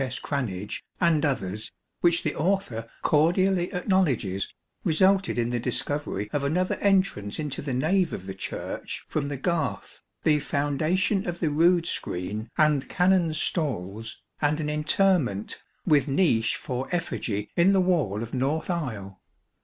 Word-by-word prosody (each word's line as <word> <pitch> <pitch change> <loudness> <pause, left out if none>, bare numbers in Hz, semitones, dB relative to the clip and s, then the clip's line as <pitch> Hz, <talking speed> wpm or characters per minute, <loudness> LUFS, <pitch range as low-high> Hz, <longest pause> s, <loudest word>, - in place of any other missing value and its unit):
S. 130 0 -3
Cranage 105 -10 -3 0.2
and 170 -4 +3
others, 110 -7 -2 0.3
which 170 -1 +3
the 155 - 0
author 155 - -1
cordially 175 +4 +3
acknowledges, 165 - 0 0.3
resulted 190 +3 +3
in 120 0 0
the 120 - 0
discovery 125 -3 -1
of 145 - 0
another 180 +6 +1
entrance 190 - +1
into 150 -3 -3
the 135 -3 -3
nave 170 +6 +2
of 95 - -6
the 95 - -5
Church 95 - -5
from 145 -2 -2
the 145 -1 -4
Garth, 140 - -2 0.2
the 150 -1 +4
foundation 155 +9 0
of 175 0 -3
the 160 -4 0
rood 170 +3 +4
screen 105 - -3
and 150 -4 +3
Canons' 180 -4 +2
stalls, 115 - -2 0.2
and 150 +1 +2
an 150 -1 -1
interment, 150 - +1 0.3
with 150 -4 +4
niche 135 -7 +2
for 130 +1 -4
effigy 110 - -2
in 175 +3 +5
the 195 - +4
wall 155 - +1
of 115 - -8
north 145 +6 0
aisle. 110 - -4
150 Hz, 145 wpm, -26 LUFS, 115-175 Hz, 0.3 s, in